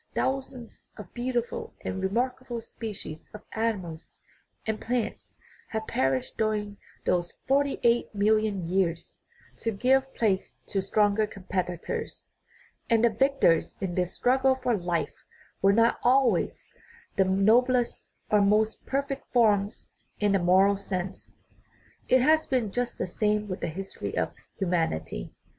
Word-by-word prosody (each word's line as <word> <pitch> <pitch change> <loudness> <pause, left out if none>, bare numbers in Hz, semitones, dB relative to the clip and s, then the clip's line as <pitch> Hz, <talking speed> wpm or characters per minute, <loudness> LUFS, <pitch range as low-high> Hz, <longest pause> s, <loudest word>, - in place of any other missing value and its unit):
Thousands 265 -3 -3
of 205 -5 -10
beautiful 250 - -3
and 190 - -4
remarkable 240 +4 -1
species 210 -8 -8
of 210 - -10
animals 190 -8 -3 0.5
and 220 -1 -2
plants 240 -1 -3 0.3
have 220 0 -3
per 135 -8 +1
ished - - -9
during 210 -2 -1 0.3
those 175 -1 0
forty 280 +1 +2
eight 235 0 +3
million 210 -3 +2
years, 175 -2 -1 0.4
to 230 - -2
give 265 +5 +2
place 200 -5 0
to 195 - -1
stronger 210 +1 +2
competitors, 185 -3 -4 0.6
and 230 0 +4
the 235 - +4
victors 265 -7 +2
in 190 -2 -2
this 180 0 0
struggle 265 +1 +3
for 255 -2 0
life 175 -3 -1 0.5
were 195 - +5
not 230 +3 +3
always 245 -6 +2 0.5
the 195 - +4
noblest 235 +6 +2 0.2
or 210 -1 +5
most 215 +2 +2
perfect 275 0 -3
forms 210 -4 +2 0.3
in 205 -1 +2
a 195 - +3
moral 190 +3 +4
sense. 190 -1 -5 0.7
It 255 - +5
has 315 +3 +4
been 245 -7 0
just 245 +2 -2
the - - -1
same 210 +3 0
with 185 -2 -5
the - - -1
history 190 +4 -5
of - - 0 0.2
human 175 -4 +1
ity. 80 -6 -6
215 Hz, 135 wpm, -27 LUFS, 190-245 Hz, 0.7 s, were